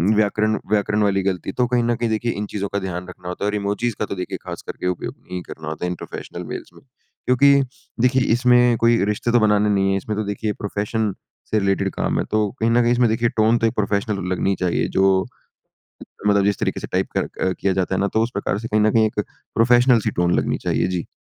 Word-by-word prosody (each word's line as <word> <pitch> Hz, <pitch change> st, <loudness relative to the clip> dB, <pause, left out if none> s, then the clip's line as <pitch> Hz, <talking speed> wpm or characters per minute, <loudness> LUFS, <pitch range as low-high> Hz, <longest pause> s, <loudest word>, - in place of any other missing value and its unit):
व्याकरण 110 Hz, +1 st, +1 dB
व्याकरण 105 Hz, 0 st, +1 dB
वाली 100 Hz, -1 st, +2 dB
गलती 95 Hz, -1 st, -2 dB
तो 125 Hz, +4 st, 0 dB
कहीं 120 Hz, -1 st, +1 dB
न 120 Hz, 0 st, +1 dB
कहीं 120 Hz, -1 st, -1 dB
देखिए 115 Hz, +2 st, 0 dB
इन 105 Hz, +1 st, -3 dB
चीज़ों 100 Hz, -1 st, -2 dB
का 100 Hz, -, +1 dB
ध्यान 90 Hz, -1 st, -5 dB
रखना 90 Hz, -1 st, -11 dB
होता 90 Hz, +3 st, -4 dB
है -, -, +2 dB
और 105 Hz, -, -2 dB
इमोजिज़ 105 Hz, +3 st, -1 dB
का 105 Hz, -, 0 dB
तो 100 Hz, -, -5 dB
देखिए 90 Hz, -1 st, -4 dB
ख़ास -, -, -6 dB
करके 90 Hz, -, -4 dB
उपयोग 90 Hz, -, -3 dB
नहीं 90 Hz, 0 st, -7 dB
करना 80 Hz, -1 st, -8 dB
होता 80 Hz, +3 st, -4 dB
है -, -, -1 dB
इन 90 Hz, -, -3 dB
प्रोफ़ेशनल -, -, -7 dB
मेल्स -, -, -6 dB
में। -, -, -17 dB, 0.4 s
क्योंकि 140 Hz, +3 st, +5 dB, 0.5 s
देखिए 130 Hz, +1 st, +3 dB
इसमें 125 Hz, -1 st, +4 dB
कोई 115 Hz, -1 st, +3 dB
रिश्ते 105 Hz, +3 st, -1 dB
तो 120 Hz, -, +5 dB
बनाने 105 Hz, -1 st, +3 dB
नहीं 95 Hz, -1 st, +2 dB
है 95 Hz, -, +1 dB
इसमें 105 Hz, +2 st, -4 dB
तो 110 Hz, -, 0 dB
देखिए 105 Hz, +1 st, -2 dB
प्रोफ़ेशन 105 Hz, +1 st, -1 dB, 0.4 s
से 110 Hz, -, +3 dB
रिलेटेड 95 Hz, -1 st, +1 dB
काम -, -, 0 dB
है -, -, -1 dB
तो 105 Hz, -1 st, +2 dB
कहीं 115 Hz, +1 st, +2 dB
न 120 Hz, +1 st, +4 dB
कहीं 120 Hz, -, +2 dB
इसमें 120 Hz, -1 st, +3 dB
देखिए 115 Hz, +1 st, +1 dB
टोन 110 Hz, +2 st, +4 dB
तो 115 Hz, -, +3 dB
एक 110 Hz, -, -2 dB
प्रोफ़ेशनल 100 Hz, -1 st, -1 dB
लगनी 95 Hz, +2 st, 0 dB
चाहिए 90 Hz, -2 st, 0 dB
जो। 95 Hz, 0 st, +4 dB, 1.0 s
मतलब 100 Hz, -1 st, +4 dB
जिस 100 Hz, -1 st, +1 dB
तरीके -, -, -2 dB
से -, -, -5 dB
टाइप -, -, 0 dB
क -, -, +1 dB, 0.3 s
किया 95 Hz, -, +1 dB
जाता 95 Hz, 0 st, 0 dB
है -, -, 0 dB
ना 100 Hz, -, +1 dB
तो 110 Hz, -, +3 dB
उस 115 Hz, -, -1 dB
प्रकार 100 Hz, 0 st, -1 dB
से 115 Hz, +1 st, -5 dB
कहीं 105 Hz, 0 st, +2 dB
न 110 Hz, -, +4 dB
कहीं 110 Hz, -1 st, +4 dB
एक 105 Hz, -1 st, -2 dB, 0.3 s
प्रोफ़ेशनल 120 Hz, +1 st, +5 dB
सी -, -, -1 dB
टोन 85 Hz, 0 st, +2 dB
लगनी -, -, 0 dB
चाहिए। -, -, +1 dB
जी। 90 Hz, -2 st, -3 dB
105 Hz, 245 wpm, -21 LUFS, 95-115 Hz, 1.0 s, क्योंकि